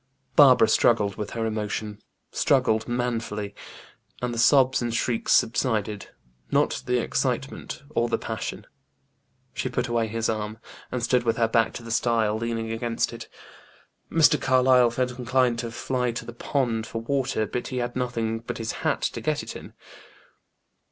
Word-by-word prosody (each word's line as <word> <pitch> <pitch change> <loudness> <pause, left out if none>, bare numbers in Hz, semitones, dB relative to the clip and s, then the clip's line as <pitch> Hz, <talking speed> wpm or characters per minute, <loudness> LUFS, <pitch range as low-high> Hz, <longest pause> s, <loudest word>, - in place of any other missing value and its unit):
Barbara 130 -6 +7
struggled 110 -2 +3
with 105 -1 -5
her 115 - 0
emotion 105 -1 -3 0.3
struggled 110 0 +2
manfully 115 -4 -2 0.7
and 125 -1 -2
the 115 - -3
sobs 130 +1 +5
and 120 -1 -1
shrieks 115 0 -1
subsided; 110 -3 +1 0.4
not - - +1
the 125 0 +2
excitement 130 +3 -2
or 120 -4 0
the - - +1
passion. - - -5 0.9
She 130 - -2
put 125 0 -1
away 115 -1 0
his 115 +1 -2
arm, 110 0 -3 0.3
and 125 -2 -3
stood 125 +1 +3
with 115 -1 0
her 115 -1 +3
back 115 0 +2
to 120 - -7
the 115 - -7
stile, 115 -2 +1
leaning 115 0 -3
against 115 0 -1
it. - - -9 0.8
Mr. 155 -3 +4
Carlyle 130 -1 +5
felt 125 +1 -2
inclined 125 -1 +1
to 115 - -3
fly 125 +1 -1
to - - -5
the 120 - -8
pond 120 -3 -1
for 115 - -4
water, 130 -1 -1
but 120 - -4
he 130 - -4
had 120 0 -2
nothing 115 -3 -1
but 115 - -6
his 115 0 -3
hat - - 0
to - - -2
get - - -1
it - - -8
in. - - -10
115 Hz, 165 wpm, -25 LUFS, 115-125 Hz, 0.9 s, Barbara